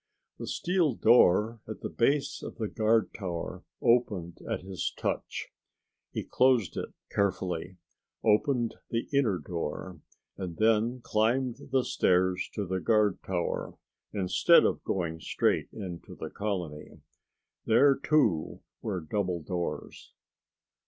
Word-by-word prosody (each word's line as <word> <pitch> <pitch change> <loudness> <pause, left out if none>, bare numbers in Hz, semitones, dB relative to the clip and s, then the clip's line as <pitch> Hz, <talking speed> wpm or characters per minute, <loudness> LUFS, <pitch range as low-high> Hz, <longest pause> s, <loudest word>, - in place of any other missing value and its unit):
The - - -5
steel 175 -7 +1
door 110 0 +5
at 110 - -7
the - - -3
base 140 +4 +1
of - - -7
the 110 - -2
guard 110 +1 +2
tower 90 -5 -5 0.2
opened 100 -8 +2
at - - -1
his 95 -1 -3
touch. - - -3 0.6
He - - -3
closed 125 -6 +2
it - - -4 0.2
carefully, 95 -3 -1 0.5
opened 115 +2 +2
the 115 0 -2
inner 125 -9 +3
door 85 +1 -5 0.4
and 90 -4 -5
then 115 +3 +2
climbed 115 +3 +1
the 130 -2 +2
stairs 90 0 +2
to 105 - -1
the 95 +1 -2
guard 105 -1 +2
tower, 90 -2 -3 0.3
instead 95 -3 +4
of - - 0
going 85 -4 -2
straight - - 0
into 90 -5 -7
the 80 - -7
colony. 90 -8 -4 0.7
There, 135 +5 +6
too, 135 - +1 0.2
were 100 -5 -2
double 90 0 -2
doors. 85 +1 -5
105 Hz, 125 wpm, -29 LUFS, 90-115 Hz, 0.7 s, There